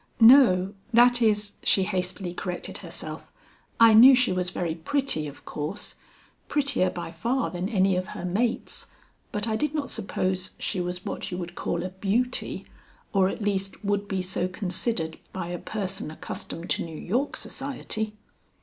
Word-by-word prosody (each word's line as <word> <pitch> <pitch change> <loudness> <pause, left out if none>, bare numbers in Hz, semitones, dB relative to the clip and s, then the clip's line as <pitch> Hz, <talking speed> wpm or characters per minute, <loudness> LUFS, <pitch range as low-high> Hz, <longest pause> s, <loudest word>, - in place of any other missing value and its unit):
"No, 225 -6 +7 0.2
that 245 +1 +6
is," 210 -2 +2
she 195 - +3
hastily 185 -1 -2
corrected 180 0 -5
herself, - - -7 0.5
"I 230 -1 +8
knew 250 +5 +10
she 250 -4 +2
was 180 -1 -1
very 175 -3 -2
pretty 170 - 0
of 145 - -11
course, 155 +7 -4 0.5
prettier 280 -10 +2
by 175 -2 -6
far 230 +4 -1
than 180 +2 -3
any 195 -3 +3
of 185 +1 -1
her - - -5
mates, 225 +7 -1 0.4
but 210 +1 0
I 220 - 0
did 300 +5 -1
not 290 -2 -2
suppose 185 -3 -2
she 185 - -2
was 180 +1 -4
what - - -4
you 180 - -3 0.2
call 170 0 -2
a 185 - -3
beauty, 210 +7 0 0.5
or 190 -2 +4
at 210 - -5
least 195 0 -2
would 205 0 0
be 190 -2 -1
so 180 -1 -1
considered 185 -2 -1
by 185 -2 -4
a 175 -1 -4
person 195 -6 -3
accustomed 165 +2 -6
to - - +1
New 160 -2 -7
York 250 - -1
society." 240 -6 -3
195 Hz, 160 wpm, -26 LUFS, 180-230 Hz, 0.5 s, knew